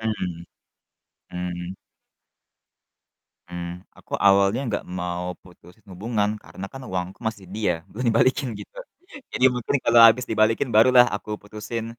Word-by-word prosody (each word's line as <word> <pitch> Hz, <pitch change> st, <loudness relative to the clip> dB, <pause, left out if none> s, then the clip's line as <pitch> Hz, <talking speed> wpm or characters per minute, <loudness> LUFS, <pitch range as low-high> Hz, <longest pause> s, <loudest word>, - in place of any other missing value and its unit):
Hmm. 90 Hz, -6 st, -3 dB, 0.9 s
Hmm. 90 Hz, 0 st, -5 dB, 1.7 s
Hmm, 85 Hz, 0 st, -6 dB, 0.3 s
aku -, -, -18 dB
awalnya 100 Hz, +4 st, +4 dB
gak -, -, -3 dB
mau 90 Hz, 0 st, -3 dB, 0.2 s
putusin 90 Hz, +3 st, -19 dB
hubungan, 105 Hz, +2 st, -1 dB
karena 95 Hz, -, -9 dB
kan 135 Hz, -, -9 dB
uangku 90 Hz, +2 st, -4 dB
masih 100 Hz, -4 st, -9 dB
dia, 105 Hz, -5 st, +1 dB, 0.2 s
belum 125 Hz, +5 st, -5 dB
dibalikin 130 Hz, +4 st, +2 dB
gitu. -, -, -13 dB, 0.6 s
Jadi 125 Hz, -, 0 dB
mungkin 125 Hz, +2 st, -2 dB
kalo 115 Hz, 0 st, +5 dB
abis 120 Hz, +3 st, +2 dB
dibalikin 110 Hz, +4 st, +2 dB
barulah 125 Hz, +3 st, +7 dB
aku 105 Hz, -, -6 dB
putusin. 110 Hz, +2 st, -6 dB
105 Hz, 125 wpm, -24 LUFS, 90-115 Hz, 1.7 s, barulah